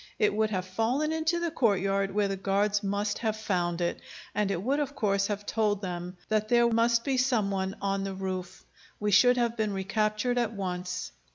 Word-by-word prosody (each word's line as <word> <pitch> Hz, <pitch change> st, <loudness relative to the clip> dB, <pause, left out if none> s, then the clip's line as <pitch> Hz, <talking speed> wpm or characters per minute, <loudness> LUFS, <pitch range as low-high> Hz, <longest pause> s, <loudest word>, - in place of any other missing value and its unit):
It 210 Hz, -, +2 dB
would 215 Hz, +1 st, +1 dB
have 185 Hz, -3 st, -2 dB
fallen 235 Hz, +11 st, 0 dB
into 320 Hz, +2 st, 0 dB
the 340 Hz, -1 st, -1 dB
courtyard, 195 Hz, -, +1 dB
where 205 Hz, +1 st, +1 dB
the 195 Hz, -, -2 dB
guards 200 Hz, +2 st, +1 dB
must 205 Hz, +1 st, -1 dB
have 220 Hz, -2 st, -1 dB
found 180 Hz, -5 st, -1 dB
it, 170 Hz, -, -1 dB, 0.3 s
and 210 Hz, -1 st, 0 dB
it 190 Hz, -2 st, -2 dB
would 275 Hz, +5 st, +1 dB
of 285 Hz, -1 st, -2 dB
course 200 Hz, -3 st, +1 dB
have 205 Hz, -1 st, -3 dB
told 210 Hz, -2 st, 0 dB
them 180 Hz, 0 st, -5 dB
that 215 Hz, 0 st, 0 dB
there 235 Hz, -1 st, +5 dB
must 230 Hz, +1 st, +3 dB
be 270 Hz, 0 st, 0 dB
some 245 Hz, -6 st, +2 dB
one 190 Hz, 0 st, -2 dB
on 195 Hz, 0 st, 0 dB
the 195 Hz, -1 st, -4 dB
roof. 185 Hz, -1 st, -5 dB, 0.3 s
We 210 Hz, 0 st, 0 dB
should 245 Hz, +5 st, +6 dB
have 235 Hz, -1 st, +1 dB
been 215 Hz, -3 st, -1 dB
recaptured 215 Hz, +5 st, 0 dB
at 230 Hz, -2 st, 0 dB
once." 180 Hz, -, -4 dB
205 Hz, 200 wpm, -28 LUFS, 195-230 Hz, 0.3 s, should